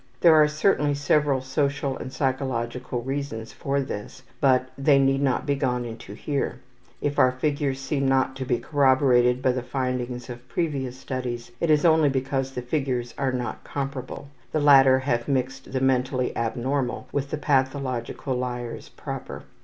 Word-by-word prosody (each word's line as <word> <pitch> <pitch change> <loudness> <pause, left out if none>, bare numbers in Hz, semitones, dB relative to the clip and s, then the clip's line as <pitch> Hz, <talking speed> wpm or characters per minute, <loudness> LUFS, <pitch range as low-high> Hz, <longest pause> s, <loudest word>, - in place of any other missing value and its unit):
There 170 -2 +7
are 155 -1 +6
certainly 150 -1 +2
several 145 -1 +2
social 140 0 -1
and 130 - -7
psychological 130 -2 -2
reasons 135 -4 -4
for 140 0 -1
this, 130 0 -6 0.2
but 130 -2 +3
they 140 0 +4
need 135 0 +3
not 135 0 +1
be 145 - +1
gone 125 -3 -1
into 110 -3 -8
here. 140 +4 -2 0.4
If 145 0 -1
our 130 - +6
figures 140 0 -1
seem 135 0 -1
not 130 0 +2
to 135 - -3
be 125 -1 +1
corroborated 130 -3 +3
by 130 - +4
the 125 0 -2
findings 125 -1 -3
of 120 -1 -10
previous 135 -7 -2
students 125 -3 -5
it 170 - 0
is 150 0 +4
only 160 -3 +5
because 135 0 -1
the 125 - -4
figures 125 -3 -2
are 135 -1 0
not 125 -2 -4
comparable 135 0 -5 0.2
the 155 - +1
latter 135 -3 +7
have 125 -3 -1
mixed 135 -1 -2
the 130 -1 -1
mentally 130 -1 +1
abnormal 125 +3 -2
with 140 0 -2
the 155 - -2
pathological 130 -2 -1
liars 125 -1 -4
proper. - - -7
130 Hz, 160 wpm, -25 LUFS, 125-140 Hz, 0.4 s, There